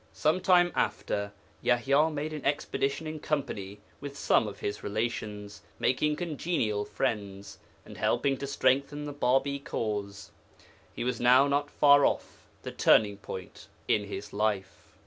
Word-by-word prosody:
Some 160 +4 +1
time 175 -2 +4
after, 100 0 -1 0.3
Yaḥya 140 +6 +3
made 150 +1 -4
an 150 - -6
expedition 140 +1 -1
in 155 0 -5
company 105 -10 -3 0.2
with 140 0 -8
some 110 - +2
of 105 - -7
his 105 0 -4
relations, 105 -1 -4 0.2
making 150 +4 +1
congenial 150 - -1
friends, 100 -6 -3 0.3
and - - -11
helping 140 -1 +1
to 140 - -5
strengthen 140 +2 +1
the 145 - -5
Bābī 140 +1 +1
cause. 100 -5 -4 0.6
He - - -5
was 125 -1 -2
now 125 +3 +6
not 145 +1 0
far 145 -1 +5
off - - -1 0.2
the - - -5
turning 105 -2 +4
point 95 -2 -9 0.2
in 105 - +2
his 100 +1 -7
life. 100 -2 -2
130 Hz, 145 wpm, -29 LUFS, 105-145 Hz, 0.6 s, now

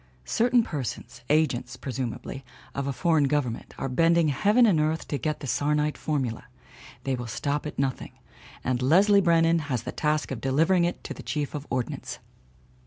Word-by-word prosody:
Certain 240 +1 +3
persons, 145 - -5
agents, 130 -5 +1
presumably, 130 +1 -5 0.3
of 140 0 -3
a - - 0
foreign 160 0 +2
government, 135 -5 -2
are - - -2
bending 165 +4 +3
heaven 210 - +4
and 190 -8 +4
earth 155 +1 0
to 145 - -2
get 155 -2 -2
the - - -5
sarnite 150 +3 +1
formula. 130 -7 -2 0.6
They 135 - -1
will 120 -1 -4
stop 145 +6 -2
at - - -8
nothing. 135 -1 -2 0.5
And 130 -1 0
Leslie 195 +9 +5
Brennan 165 -1 +4
has 125 -5 -1
the - - -4
task 150 -1 -1
of 130 - -4
delivering 165 +7 +3
it 175 - -3
to - - -5
the - - -10
Chief 150 -2 -3
of 150 -1 -6
Ordnance. 125 -3 -3
150 Hz, 175 wpm, -26 LUFS, 135-165 Hz, 0.6 s, Leslie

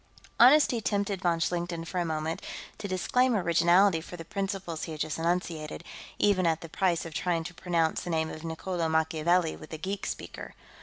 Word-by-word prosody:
Honesty 255 -2 +6
tempted 200 -2 -1
von 170 -2 +1
Schlichten, 170 0 -2
for 180 +2 -3
a 175 - 0
moment, 160 0 -2 0.4
to 205 - -4
disclaim 245 +7 +2
originality 175 0 +4
for 175 +1 -9
the 165 - -8
principles 195 -3 -3
he 160 - -6
had 155 - -5
just 155 0 -2
enunciated, 165 -2 -2 0.3
even 185 -4 +3
at 160 -1 +1
the 165 - -8
price 175 0 +1
of 165 - -7
trying 165 +1 0
to 175 - -7
pronounce 170 -2 0
the - - -6
name 160 -1 0
of 155 - -8
Niccolo 165 +1 -2
Machiavelli 160 +2 +2
with 155 - -12
a - - -3
geek 195 +5 -4
speaker. - - -7
170 Hz, 190 wpm, -29 LUFS, 160-185 Hz, 0.4 s, Honesty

